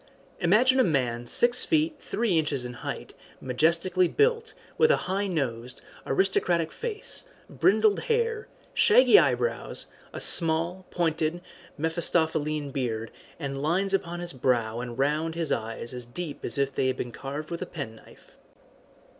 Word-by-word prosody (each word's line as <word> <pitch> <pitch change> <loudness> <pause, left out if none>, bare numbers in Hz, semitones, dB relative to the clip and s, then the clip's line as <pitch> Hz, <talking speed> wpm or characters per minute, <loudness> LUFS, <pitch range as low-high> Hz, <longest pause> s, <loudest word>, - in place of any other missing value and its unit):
Imagine 240 +9 +4
a - - +6
man 120 -7 0
six 240 - +3
feet 315 -1 +1
three 215 -8 0
inches 145 -5 -1
in 125 - -6
height, - - -6 0.3
majestically 170 +7 +1
built, 455 - +1 0.2
with 465 - +4
a - - +6
high 195 +2 -1
nosed, 125 -8 -3 0.3
aristocratic 175 0 +1
face, 470 +2 -3 0.2
brindled 215 +1 +3
hair, 460 -1 -1 0.3
shaggy 250 -3 +6
eyebrows, 120 -6 -1 0.3
a - - -6
small, 170 +2 +3
pointed 165 -1 -1 0.4
Mephistophelian 160 -2 0
beard, 115 -4 -3 0.3
and 140 -2 -4
lines 185 +6 0
upon 175 -2 -1
his 175 -3 -6
brow 120 -3 0
and 120 -1 -6
round 150 +4 0
his 165 -2 -2
eyes 115 +2 -3
as 125 -1 -4
deep 145 +5 -7
as - - 0
if 140 -1 0
they 130 - 0
had 130 0 -1
been 120 - -4
carved 145 +6 -6
with 170 - -4
a 185 - -4
penknife. 115 -11 -10
160 Hz, 145 wpm, -27 LUFS, 130-190 Hz, 0.4 s, a